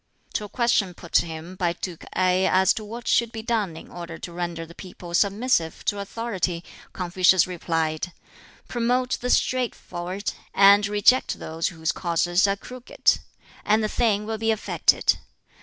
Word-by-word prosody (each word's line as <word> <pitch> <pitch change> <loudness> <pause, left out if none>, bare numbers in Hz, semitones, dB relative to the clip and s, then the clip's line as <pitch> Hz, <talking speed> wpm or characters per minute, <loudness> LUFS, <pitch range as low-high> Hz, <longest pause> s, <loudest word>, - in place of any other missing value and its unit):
To 210 - -2
a - - -10
question 220 -7 +1
put 170 - -12
to - - +3
him 160 +2 -7
by 175 -2 0
Duke 175 -1 -7
Ngai 185 0 +3
as 190 0 +4
to 220 - -6
what 230 +3 -8
should 235 -1 +2
be 225 -1 -6
done 215 -8 -1
in - - -12
order 170 -2 -7
to 170 - -8
render 170 -1 -4
the 165 - -13
people 180 -1 -10
submissive 200 -2 +1
to 205 - 0
authority, 200 -5 -3 0.3
Confucius 180 0 +3
replied, 165 -1 -2 0.6
"Promote 250 +1 0
the 250 - -2
straightforward, 200 -8 -1 0.2
and 200 +1 +7
reject 210 +5 +3
those 160 +1 -3
whose 160 -2 -2
courses 175 +2 +1
are 195 - +1
crooked, 250 +4 0 0.4
and 215 +1 +2
the - - +1
thing 210 -2 +1
will 220 0 -3
be 225 +1 0
effected. 220 -1 +2
190 Hz, 160 wpm, -24 LUFS, 175-220 Hz, 0.6 s, and